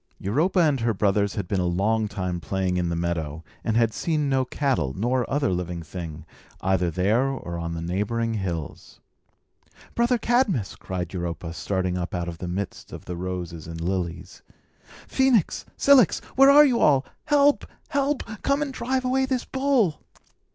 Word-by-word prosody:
Europa 155 - +1
and 150 -5 +3
her 115 -2 0
brothers 100 0 +1
had 100 -4 -3
been 95 - 0
a 90 - 0
long 105 +5 +1
time 90 -3 -3
playing 95 0 -1
in 90 -1 0
the 85 - -1
meadow, 85 -2 -3 0.2
and 110 -1 0
had 115 -2 +3
seen 155 -4 0
no 135 -1 +2
cattle, 125 - -1
nor 120 +4 0
other 140 -3 +1
living 90 -1 -3
thing, 80 -1 -7 0.4
either 95 -2 +1
there 105 +10 +2
or 90 -11 -4
on 85 0 -4
the 80 - -4
neighbouring 105 +6 -1
hills. 90 -7 -5 0.9
"Brother 240 +1 +2
Cadmus!" 220 - +1
cried 90 -2 -5
Europa, 85 -2 -4
starting 90 0 -1
up 90 +1 -4
out 85 -1 -2
of 85 -1 -6
the 90 - -5
midst 95 +3 -5
of - - -9
the 90 - -5
roses 85 -2 -5
and 80 0 -7
lilies. 90 0 -3 0.7
"Phœnix! 260 -9 +2
Cilix! 275 -8 +5 0.2
Where 270 +1 +7
are 295 +2 +9
you 250 -4 +2
all? 140 -2 +4 0.2
Help! 290 -1 +3 0.2
Help! 280 0 0 0.2
Come 280 +1 +1
and 280 -2 -5
drive 255 +1 -1
away 265 +1 +1
this 260 -2 -1
bull!" 265 - +1
100 Hz, 170 wpm, -25 LUFS, -, 0.9 s, are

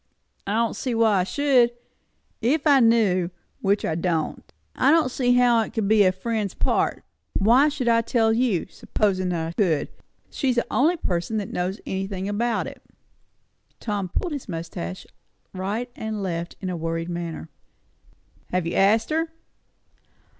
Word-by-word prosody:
"I 200 - 0
don't 230 0 +1
see 250 -3 -2
why 220 -4 +3
I - - +2
should, 250 +1 +3 0.7
if 280 +7 +1
I 285 -3 +6
knew, 215 -7 +3 0.3
which 200 +1 +1
I - - 0
don't. 165 -1 -2 0.2
I 265 - +3
don't 310 -4 +4
see 245 -1 +2
how 245 -2 +4
it 220 - -5
would 220 -3 0
be 215 0 +5
a 185 - +5
friend's 210 +1 -3
part. - - 0 0.3
Why 245 +9 +5
should 285 -4 -3
I 230 0 +4
tell 225 -1 +2
you, 230 -7 +1
supposin' 185 -3 -1
I 165 -1 -2
could? 170 -6 0 0.4
She's 260 -4 0
the 240 - +1
only 325 +7 +3
person 180 - -2
that 205 -2 -4
knows 185 +3 -2
anything 195 0 -3
about 225 +3 0
it." - - -9 1.0
Tom 205 -4 -3
pulled 340 - -2
his 280 -7 -6
moustache 165 - -5 0.5
right 210 +7 -3
and 220 -2 -4
left 170 -2 -3
in 185 -2 -3
a - - -3
worried 165 0 -3
manner. 170 - -5 1.0
"Have 180 -2 -1
you 170 - -2
asked 220 +7 +3
her?" 325 +1 0
210 Hz, 160 wpm, -24 LUFS, 180-240 Hz, 1.0 s, I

